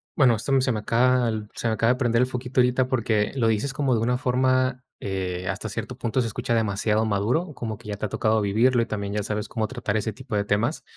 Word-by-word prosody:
bueno, 125 -6 +5
esto 115 +6 -4
m 135 -1 +4
se 130 - +1
me 110 - -1
acaba 125 +3 +2
el 110 -1 -3
se - - -3
me 110 - +1
acaba 115 +2 +2
de - - +2
aprender 120 -3 +1
el - - 0
foquito 125 0 -3
ahorita 125 +1 +3
porque 110 -5 0
lo 115 -4 +2
dices 110 +5 0
como 135 -2 0
de 115 - +1
una 125 +2 +1
forma, 130 0 +1 0.2
eh, 90 -2 -3
hasta - - -3
cierto - - -5
punto 125 +3 -1
se 115 - -1
escucha 115 +2 -2
demasiado 110 0 +1
maduro, 110 - 0
como 110 -5 -5
que 110 -1 -12
ya 105 - -3
te 105 - -2
ha - - -14
tocado 110 +2 +1
vivirlo 115 +5 +3
y 115 - -1
también 100 -1 -4
ya 105 - 0
sabes 105 0 -3
cómo 110 -1 -2
tratar 120 -4 -3
ese 110 0 0
tipo 125 -1 -6
de 100 - +2
temas. 110 +9 0
115 Hz, 255 wpm, -25 LUFS, 105-125 Hz, 0.2 s, bueno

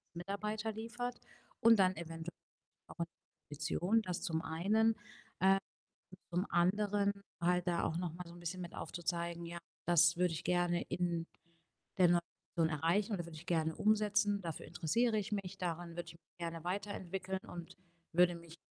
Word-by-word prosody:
Mitarbeiter 210 +5 -2
liefert 240 +3 -4 0.4
und 230 0 +7
dann 185 -2 +4
eventuell 165 0 -5 0.6
auch - - -10
eine 170 - 0 0.4
Position, 170 +8 +1
das 180 -3 -3
zum 165 -4 0
einen. 215 +8 +2 0.5
Ähm, 195 +1 +6 0.7
zum 180 +4 +1
anderen 200 +3 +3 0.3
halt 180 +1 +2
da 175 -1 +2
auch 160 - 0
noch 175 -2 -2
mal 180 +2 -6
so 170 - -10
'n 175 - -11
bisschen 175 +2 -4
mit 175 - -7
aufzuzeigen: 170 0 -2
„Ja, 170 +1 -5 0.3
das 170 0 +6
würde 180 -1 +2
ich 160 - -4
gerne 175 -1 +2
in 170 -2 -1 0.7
der 185 - +8
neuen 175 0 +5 0.3
Position 165 -1 +3
erreichen 195 +7 +2
und 195 - 0
das 175 - -3
würde 165 - -9
ich 155 - -11
gerne 160 -2 +1
umsetzen. 210 -1 +3
Dafür 165 -2 -5
interessiere 220 +8 +1
ich 210 0 -3
mich, 195 -2 -3
daran 175 -1 -2
würde 175 - -3
ich 170 - -9
mich 165 +1 -24
gerne 165 -1 -4
weiterentwickeln 190 0 -3
und 170 -1 -8 0.4
würde 175 0 +6
mich, 170 -1 -11
175 Hz, 170 wpm, -36 LUFS, 170-200 Hz, 0.7 s, der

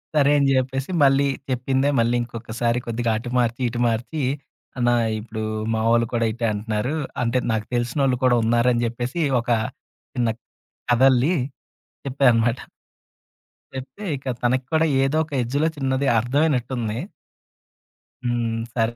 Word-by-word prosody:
సరే 145 -1 +4
అని 140 - +3
చెప్పేసి 135 +4 -1
మళ్ళీ 140 0 +4 0.2
చెప్పిందే 130 +2 +1
మళ్ళీ 115 +1 +2
ఇంకొకసారి 115 0 -2
కొద్దిగా 115 0 -1
అటు 120 +2 -6
మార్చి, 120 0 +1
ఇటు 120 +1 -5
మార్చీ 120 +7 -2 0.6
"అన్న 120 -1 +2 0.3
ఇప్పుడు 110 0 -6 0.3
మావాళ్ళు 115 +1 +2
కూడా 115 -1 +1
ఇటే 115 +1 -3
అంటున్నారు. 110 +6 -2 0.3
అంటే 120 +2 +1
నాకు 110 -1 -1
తెలిసినోళ్ళు 125 +2 +1
కూడా 125 -2 +4
ఉన్నారు" 120 +2 +3
అని 120 0 0
చెప్పేసి 120 +7 -3 0.2
ఒక 120 - -9 0.6
చిన్న 120 -2 +1 0.6
కథల్లి 130 +5 +4 0.7
చెప్పా 135 +1 -1
అనమాట. 115 +2 +1 1.2
చెప్తే 130 +10 -7
ఇక 135 - -14 0.2
తనకి 125 +1 +1
కూడా 160 0 +3 0.2
ఏదో 135 +3 +1
ఒక 155 - -19
ఎడ్జ్‌లో 145 +7 0
చిన్నది 135 0 0
అర్థవైనట్టుంది. 125 -3 0 1.3
హ్మ్. 120 -2 -1 0.2
"సరే 115 -1 +1
120 Hz, 130 wpm, -23 LUFS, 115-135 Hz, 1.3 s, సరే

